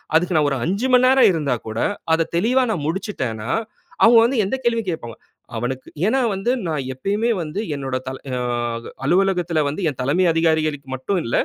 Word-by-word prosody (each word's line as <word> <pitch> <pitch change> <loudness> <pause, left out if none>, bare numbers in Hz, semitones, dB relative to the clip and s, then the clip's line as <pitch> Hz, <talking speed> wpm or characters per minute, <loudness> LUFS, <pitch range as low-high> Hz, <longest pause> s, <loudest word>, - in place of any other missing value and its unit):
அதுக்கு 175 +2 +2
நான் 150 -1 +3
ஒரு 140 - -1
5 200 +9 0
மணி 250 0 +6
நேரம் 260 -4 +6
இருந்தாக்கூட, 125 -9 -2 0.4
அத 165 0 +2
தெளிவாக 245 +9 +3
நான் 170 -9 -2
முடிச்சுட்டேன்னா, 130 - -3 0.6
அவுங்க 230 +1 +7
வந்து 245 0 0
எந்த 200 - -1
கேள்வியும் 230 -4 0
கேட்பாங்க. 120 -8 -7 0.4
அவனுக்கு 125 +3 -4 0.2
ஏன்னா 265 +4 +2
வந்து, 195 +6 0 0.2
நான் 155 -3 -1
எப்பயுமே 205 - -1
வந்து 160 +4 -4 0.2
என்னுடைய 135 -2 -3
தல 130 0 -4 0.2
ஆ - - -2 0.7
அலுவலகத்தில 180 -2 +2
வந்து 155 +7 -4
என் 135 - -14
தலைமை 150 +8 +2
அதிகாரிகளுக்கு 155 -4 0
மட்டும் 175 +8 -1
இல்ல, 115 - -1
165 Hz, 170 wpm, -21 LUFS, 135-205 Hz, 0.7 s, அவுங்க